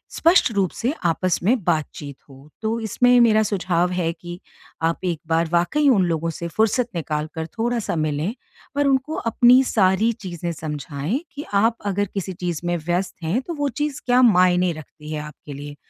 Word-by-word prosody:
स्पष्ट 335 -6 +4
रूप 195 -4 +1
से 240 +3 +1 0.2
आपस 185 +2 0
में 225 +2 +2
बातचीत 155 -4 -2
हो। 135 +2 -15
तो 225 +1 -1
इसमें 245 +3 +3
मेरा 220 -2 +5
सुझाव 180 -3 0
है 175 -2 0
कि 175 +1 -9 0.4
आप 165 +2 -1
एक 170 -3 -1
बार 165 0 +1
वाक़ई 175 +13 +2
उन 200 -8 +4
लोगों 165 -1 -1
से 170 +1 -5
फ़ुर्सत 220 +7 +1
निकाल 155 -2 -2
कर 160 0 -3
थोड़ा-सा 230 -3 -1
मिलें 155 +4 -1 0.4
पर 285 0 +2
उनको 270 +3 +1 0.2
अपनी 245 +3 +6
सारी 210 -1 +2
चीज़ें 175 -5 -5
समझाएँ 150 - -4 0.2
कि 290 - -6
आप 225 +3 +3
अगर 205 0 0
किसी 190 -1 -3
चीज़ 175 -2 -4
में 175 0 0
व्यस्त 175 +3 -2
हैं 180 +11 0
तो 340 - -6
वो 290 -2 -1
चीज़ 295 +2 -3
क्या 250 0 +4
मायने 180 -5 +4
रखती 155 0 -11
है 155 - -3
आपके 150 -1 -10
लिए। 145 +1 -8
180 Hz, 180 wpm, -22 LUFS, 165-230 Hz, 0.4 s, अपनी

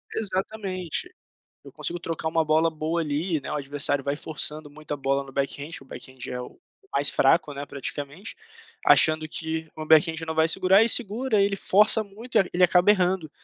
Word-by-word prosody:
Exatamente, 195 - -3 0.5
eu - - -13
consigo 175 - -1
trocar 165 -1 -4
uma 160 0 +1
bola 160 +2 +2
boa 160 +2 -3
ali, 155 +2 -2
né, 135 - -7
o - - -2
adversário 145 -1 0
vai 140 +1 -2
forçando 150 0 -3
muita 150 0 -7
bola 140 0 -1
no 135 - -13
backhand, 140 +2 -3
o - - -15
backhand 130 0 -11
é 125 - -5
o 125 - -10 0.3
o - - -28
mais 140 +1 +5
fraco 145 +2 +2
né 140 0 -7
praticamente, 145 - -7 0.5
achando 155 0 +5
que 160 0 -4
o - - -13
meu 155 - -6
backhand 160 0 +3
não 160 0 -5
vai 160 0 +3
segurar 190 +4 +4
e 225 - +1
segura, 225 0 +1
ele 200 0 +1
força 210 +3 +4
muito 215 +5 -5
e - - +6
e 185 - -6
ele 180 +1 +2
acaba 180 +2 +4
errando, 180 -4 0
160 Hz, 195 wpm, -24 LUFS, 145-190 Hz, 0.5 s, e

